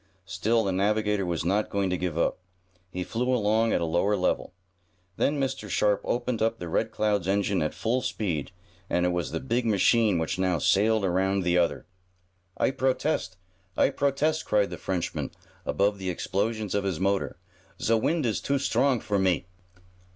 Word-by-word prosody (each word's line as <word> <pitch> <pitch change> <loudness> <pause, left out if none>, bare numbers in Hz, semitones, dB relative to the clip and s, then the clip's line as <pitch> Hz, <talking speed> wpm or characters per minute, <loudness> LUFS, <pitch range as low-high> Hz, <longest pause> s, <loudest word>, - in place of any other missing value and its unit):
Still 110 +5 +1
the 100 - 0
navigator 105 0 +1
was 85 -2 -2
not 100 +4 +1
going 100 -2 0
to - - +1
give 90 -3 -3
up. - - +1 0.5
He 90 - -3
flew 125 +6 -1
along 110 -1 +2
at - - +1
a - - +1
lower 85 +6 +1
level. 90 - 0 0.7
Then 145 0 +1
Mr. 130 -6 -2
Sharp 105 +1 +2
opened 120 -1 -1
up 115 +1 +1
the 90 - -6
Red - - 0
Cloud's 105 -4 0
engine 100 0 +1
at 75 - -2
full 120 +3 0
speed, 85 - -2 0.4
and 90 0 +1
it - - +3
was 90 -1 -1
the - - -3
big 120 -2 -1
machine 110 -1 +3
which 80 +2 -2
now 90 -2 +2
sailed 105 +6 +3
around 95 +1 +1
the 90 0 +1
other. 85 - 0 0.7
"I - - +2
protest! 130 -7 -1 0.4
I - - +4
protest!" 145 +3 0
cried 105 -1 +1
the - - -6
Frenchman, 90 -3 -2 0.4
above 100 0 +1
the 95 -1 -3
explosions 105 +3 -2
of 100 - 0
his 95 -5 -2
motor. 95 -2 0 0.4
"Ze 115 - +1
wind 150 +7 +1
is 110 -3 0
too 140 - 0
strong 135 -2 +1
for 105 -2 0
me!" 95 -2 +1
100 Hz, 180 wpm, -27 LUFS, 90-115 Hz, 0.7 s, I